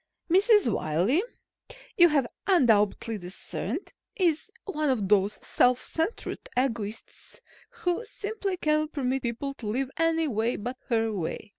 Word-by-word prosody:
Mrs. 405 Hz, -, +5 dB
Wiley, 185 Hz, -, +1 dB, 0.7 s
you 345 Hz, -1 st, +7 dB
have 285 Hz, -4 st, +2 dB, 0.2 s
undoubtedly 225 Hz, -, +3 dB
discerned, 195 Hz, -, -5 dB, 0.2 s
is 340 Hz, -8 st, +1 dB
one 305 Hz, -7 st, -1 dB
of 220 Hz, -7 st, +1 dB
those 205 Hz, 0 st, +3 dB
self 250 Hz, 0 st, +3 dB
centered 325 Hz, +8 st, -3 dB
egotists 225 Hz, -4 st, -3 dB, 0.3 s
who 355 Hz, +5 st, -2 dB
simply 415 Hz, -4 st, -4 dB
cannot 305 Hz, -1 st, +1 dB
permit 270 Hz, -2 st, -1 dB
people 245 Hz, +4 st, -3 dB
to 240 Hz, -6 st, -8 dB
live 255 Hz, +5 st, -1 dB
any 330 Hz, -1 st, +2 dB
way 230 Hz, -1 st, 0 dB
but 245 Hz, +5 st, -5 dB
her 225 Hz, -3 st, +1 dB
way. 195 Hz, +3 st, -4 dB
265 Hz, 130 wpm, -27 LUFS, 220-330 Hz, 0.7 s, you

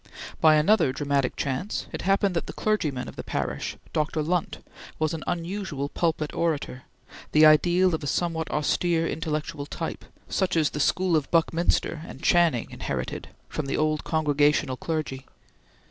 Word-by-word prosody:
By 155 Hz, -1 st, +6 dB
another 160 Hz, -1 st, +4 dB
dramatic 140 Hz, -1 st, 0 dB
chance 140 Hz, +9 st, -2 dB
it -, -, -5 dB
happened 195 Hz, 0 st, +2 dB
that 170 Hz, -, -1 dB
the -, -, -6 dB
clergyman 150 Hz, -12 st, -1 dB
of -, -, -10 dB
the -, -, -5 dB
parish, -, -, -3 dB, 0.2 s
Dr. 155 Hz, 0 st, 0 dB
Lunt, 175 Hz, +2 st, -1 dB, 0.4 s
was 155 Hz, 0 st, 0 dB
an 160 Hz, -, -4 dB
unusual 170 Hz, -5 st, -3 dB
pulpit 160 Hz, -3 st, -1 dB
orator, 150 Hz, -6 st, -2 dB, 0.5 s
the 155 Hz, +1 st, +7 dB
ideal 175 Hz, +4 st, +5 dB
of 160 Hz, -, -2 dB
a -, -, -3 dB
somewhat 160 Hz, +1 st, -1 dB
austere 165 Hz, +2 st, +1 dB
intellectual 155 Hz, -3 st, -3 dB
type, -, -, -5 dB, 0.2 s
such 190 Hz, -3 st, 0 dB
as 155 Hz, -2 st, +2 dB
the 150 Hz, -, -4 dB
school 180 Hz, +4 st, +2 dB
of 150 Hz, -3 st, 0 dB
Buckminster 165 Hz, -1 st, +1 dB
and -, -, -11 dB
Channing 170 Hz, -9 st, +3 dB
inherited -, -, -4 dB, 0.2 s
from 150 Hz, -, -4 dB
the 135 Hz, -, -1 dB
old 155 Hz, 0 st, +1 dB
Congregational 150 Hz, -3 st, +2 dB
clergy. 135 Hz, -3 st, -4 dB
155 Hz, 155 wpm, -26 LUFS, 145-170 Hz, 0.5 s, the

